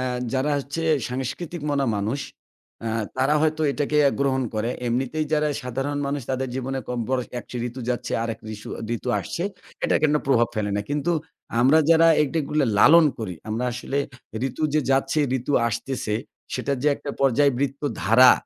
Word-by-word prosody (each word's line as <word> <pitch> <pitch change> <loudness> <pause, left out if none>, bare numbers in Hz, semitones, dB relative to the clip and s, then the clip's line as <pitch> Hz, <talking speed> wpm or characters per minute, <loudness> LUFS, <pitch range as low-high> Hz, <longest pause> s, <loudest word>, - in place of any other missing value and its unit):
আ - - -1 0.3
যারা 135 +2 +1
হচ্ছে 140 +4 -4 0.3
সাংস্কৃতিক 135 +7 -4
মনা 140 -1 +1
মানুষ, 110 +8 -1 0.7
আ - - 0 0.3
তারা 135 +3 +2
হয়তো 155 0 +1
এটাকে 145 +1 -1
অ্যা 140 - +5
গ্রহণ 135 -1 +2
করে। 110 +3 0 0.2
এমনিতেই 130 +6 0
যারা 150 0 +3
সাধারণ 135 +3 -2
মানুষ, 140 0 -1
তাদের 130 0 -1
জীবনে 130 +1 -2
কম 125 -1 -2
বড় 130 -1 +1 0.2
একশো 125 - -8
ঋতু 125 +2 -8
যাচ্ছে, 125 - -3
আরেক 115 -1 -3
রিসু 105 -1 -8 0.3
ঋতু 125 - -6
আসছে। 170 - -4 0.4
এটা - - +3
কেন 150 -1 +4
প্রভাব 120 -4 +4
ফেলে 105 -2 -1
না। - - +1
কিন্তু 150 +4 0 0.5
আমরা 135 +6 +6
যারা 165 0 +6 0.2
এগ 150 - 0
এগুলো 150 0 +1
লালন 165 +9 +8
করি, 105 -6 -4
আমরা 115 +3 -1
আসলে 135 +3 -3 0.5
ঋতু 130 +5 -7
যে 155 - +4
যাচ্ছে, 135 +2 +2 0.2
ঋতু 125 +4 -3 0.2
আসতেছে, 115 -1 -3 0.4
সেটার 140 -1 -1
যে 150 - +4
একটা 145 - -6
পর্যায়ে 140 +1 +4
বৃত্তধারা 130 -3 +4
135 Hz, 170 wpm, -24 LUFS, 125-145 Hz, 0.7 s, লালন